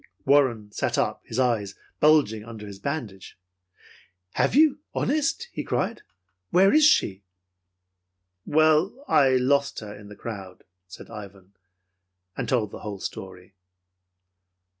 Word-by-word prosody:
Warren 130 -7 +2
sat - - -2
up, - - 0
his 115 - -5
eyes 115 -6 0 0.2
bulging 145 -9 +3
under, 110 -2 -9
his 100 -1 -10
bandage. 115 -8 -5 0.9
"Have - - +1
you, 305 -1 +5 0.2
honest?" 315 - 0
he - - -5
cried. 230 - -2 0.5
"Where 190 +5 +4
is 310 +1 +5
she?" 100 - +3 1.2
"Well, 155 - +2
I 135 - +4
lost 140 +2 +1
her 105 -1 -8
in 105 0 -13
the 105 - -11
crowd," 95 -6 -8 0.2
said 90 - -12
Ivan, 100 -2 -11 0.8
and - - -4
told 115 -6 0
the - - -8
whole 105 -2 -6
story. 95 0 -8
115 Hz, 125 wpm, -25 LUFS, 100-155 Hz, 1.2 s, you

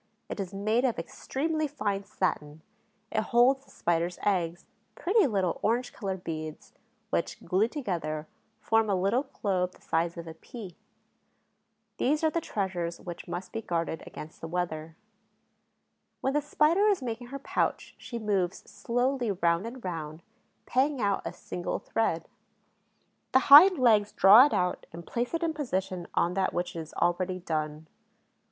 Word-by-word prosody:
It - - -5
is 190 -2 -3
made 215 +5 +1
of 250 -4 +1
extremely 310 - -2
fine 205 -8 -2
satin; 155 -5 -2 0.5
it 215 - +1
holds 250 +5 +3
the - - -23
Spider's 170 +1 -1
eggs, 175 -4 0 0.3
pretty 390 -1 +3
little 190 -7 0
orange 240 +3 0
colored 190 -3 -4
beads, 155 -1 -6 0.4
which, - - -1
glued 210 +6 +2
together, 170 - -3 0.3
form 225 -1 +2
a 195 - +3
little 205 +9 +1 0.2
globe 185 -3 +1
the - - -21
size 170 +1 0
of 170 - -6
a 165 - -8
pea. 200 -1 -10 1.2
These 300 +5 +1
are 315 - +3
the 335 - -1
treasures 180 - -3
which 175 -1 -8
must 180 +2 -5
be 225 - -4
guarded 165 -4 -2
against 155 - -10
the 165 - -5
weather. 165 -2 -3 1.3
When 265 - 0
the 295 - +2
Spider 305 +7 +3
is 395 -9 +2
making 240 0 -4
her 275 +3 -6
pouch 275 - -2
she 235 - -6
moves 200 -5 -1
slowly 245 0 -1
round 170 +1 +1
and 240 -2 -9
round, 160 -2 -5 0.4
paying 270 +2 +1
out 200 -3 +1
a - - -3
single 175 - -4
thread. 165 -7 -1 1.1
The 260 - +7
hind 360 +5 +11
legs 215 -5 +4
draw 215 +8 +8
it - - -7
out 180 0 -1
and 170 +1 -9
place 245 +6 -2
it 330 - -2
in 325 -1 0
position 190 - -3
on 175 - +2
that 190 0 0
which 175 0 -2
is 160 -1 -6
already 180 +1 0
done. 155 -3 -3
195 Hz, 160 wpm, -29 LUFS, 170-250 Hz, 1.3 s, hind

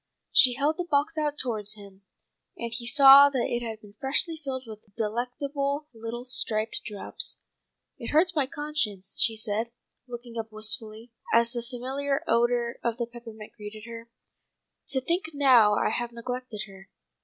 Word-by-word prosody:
She 250 -2 +6
held 290 +4 0
the 355 - -3
box 290 +2 +1
out 300 -2 -1
towards 215 -5 -1
him, 200 -2 -14 0.6
and 235 -1 -5
he 235 0 -4
saw 275 +2 +9
that 260 -4 -1
it 240 - -2
had 225 -2 -6
been 205 -1 -15
freshly 290 +5 +2
filled 270 -4 -5
with 215 -2 -9 0.2
delectable 275 +6 -3
little 230 +2 -6
striped 220 -3 +2
drops. 205 -2 -3 0.6
"It 235 - -6
hurts 340 +3 +3
my 285 -4 +1
conscience," 275 - -3
she 225 -2 +3
said, 220 +1 -2 0.4
looking 240 -1 -7
up 220 0 -6
wistfully, 215 +1 -1 0.2
as 235 0 +4
the 240 -1 -3
familiar 265 +4 -3
odour 235 0 +1
of 235 -1 -1
the 240 - -1
peppermint 230 -2 -11
greeted 210 0 -9
her, 230 0 -10 0.8
"to 265 - +1
think 340 +6 -1
how 240 -7 +6
I - - +1
have 240 +1 -3
neglected 240 -2 -5
her. 195 -1 -15
240 Hz, 160 wpm, -27 LUFS, 220-275 Hz, 0.8 s, saw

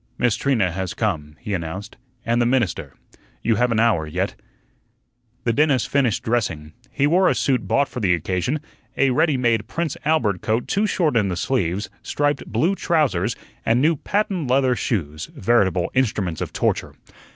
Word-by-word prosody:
"Miss 120 -3 +2
Trina 115 -10 +1
has 95 0 -4
come," 80 -9 -2
he 105 - -4
announced, 95 +5 -5 0.3
"and 115 +1 +2
the - - +3
minister. 120 -7 0 0.5
You 115 -2 +2
have 125 +1 +2
an 110 - +1
hour 110 -9 +2
yet." 90 +5 -2 1.1
The 115 - +1
dentist 140 -2 +2
finished 130 -6 +1
dressing. 85 -10 -1 0.2
He 140 - 0
wore 180 +5 +4
a - - +1
suit 130 -4 0
bought 140 0 +2
for 125 - -6
the 90 -6 +3
occasion 90 - -2 0.4
a 135 -1 +3
ready 150 +1 +2
made 115 -4 +1
"Prince 165 +1 -2
Albert" 140 - +1
coat 110 +2 0
too 205 +2 +1
short 160 -9 +1
in 105 -3 +3
the 90 -2 -2
sleeves, 95 -4 -1
striped 145 -1 -1
"blue" 180 +5 +1
trousers, 130 - +1 0.3
and 115 +2 +2
new 160 +5 +3
patent 195 - -1
leather 130 -1 +3
shoes 80 - -2
veritable 95 -5 +2
instruments 105 -10 0
of - - -3
torture. - - -1
115 Hz, 170 wpm, -22 LUFS, 95-140 Hz, 1.1 s, wore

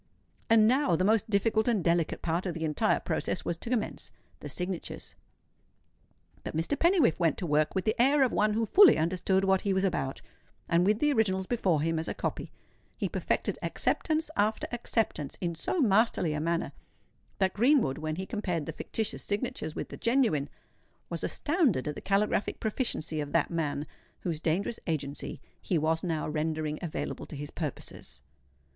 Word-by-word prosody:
And 220 -1 +6
now 255 - +3
the 185 - +1
most 220 +2 +2
difficult 220 +2 +2
and 220 -7 +2
delicate 170 -1 +1
part 170 +3 -1
of 175 - -3
the 165 -1 -2
entire 150 -2 +2
process - - -2
was 170 - -1
to 230 - -7
commence—the 240 -4 -5
signatures. 180 -1 -4 1.3
But - - -4
Mr. 165 - 0
Pennywhiffe 335 - +3
went 165 -2 +2
to 180 - -3
work 150 +1 +1
with 190 - 0
the 215 - +3
air 275 +2 +5
of 255 - +1
one 210 0 +2
who 225 +1 +1
fully 390 - +7
understood 185 +4 +1
what 190 -1 +3
he 200 - 0
was 190 - +1
about; 155 -8 -1 0.4
and 170 +2 +3
with 210 0 +3
the 295 +4 +2
originals 190 -5 +1
before 185 -9 +1
him 165 0 0
as 160 - -4
a - - -3
copy, - - -4 0.5
he - - -1
perfected - - -1
acceptance 315 0 0
after 215 +2 +1
acceptance 225 - -2
in 170 -2 -2
so 165 - -2
masterly 215 - +3
a 150 - -2
manner, 170 +2 -1 0.7
that 190 -1 +1
Greenwood, 235 - +3
when 155 0 -3
he 190 +3 -4
compared 180 -8 -2
the - - -5
fictitious 220 -2 -3
signatures 205 -6 -3
with - - -4
the - - -8
genuine, 230 - +2 0.6
was - - -3
astounded 290 - +1
at 150 - -1
the - - -8
caligraphic 200 +1 0
proficiency 210 - -2
of 145 -1 -6
that 165 0 +2
man 150 -3 -1 0.4
whose 165 -4 -2
dangerous 175 +8 -1
agency 145 -3 -3 0.2
he 180 - 0
was 160 +1 0
now 165 -4 -1
rendering 155 0 -2
available 170 -3 -4
to - - -8
his 145 +1 -6
purposes. 140 - -7
185 Hz, 175 wpm, -29 LUFS, 160-220 Hz, 1.3 s, fully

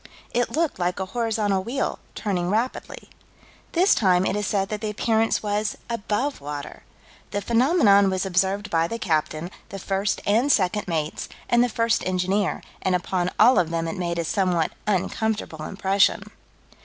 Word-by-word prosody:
"It 245 0 +1
looked 320 - -1
like 180 +1 -1
a 190 - -1
horizontal 210 -2 0
wheel, 255 +6 -2 0.2
turning 180 -4 -1
rapidly." 225 +6 -2 0.7
This 365 +4 +4
time 185 -3 +3
it - - 0
is 210 -1 -1
said 195 -2 0
that 215 -1 -4
the 215 - -2
appearance 220 +2 +1
was 210 0 -1
above 230 - -2
water. 145 0 -7 0.5
"The 205 - -2
phenomenon 225 - +4
was 190 0 -1
observed 195 +3 0
by 165 0 +2
the 230 - -4
captain, 160 -2 -1 0.2
the 195 - -6
first 195 +1 -1
and 235 +8 +3
second 205 -2 +1
mates, 155 -3 -3 0.2
and 240 0 +4
the 245 - +1
first 230 0 +1
engineer, 185 +2 0 0.2
and 185 -1 +1
upon 180 0 -1
all 245 +1 +7
of 170 -3 +1
them 165 0 -2
it 165 - -3
made 170 -2 -2
a 170 - 0
somewhat 175 -2 0 0.2
uncomfortable 210 -4 -1
impression." 195 0 +1
200 Hz, 165 wpm, -24 LUFS, 180-220 Hz, 0.7 s, all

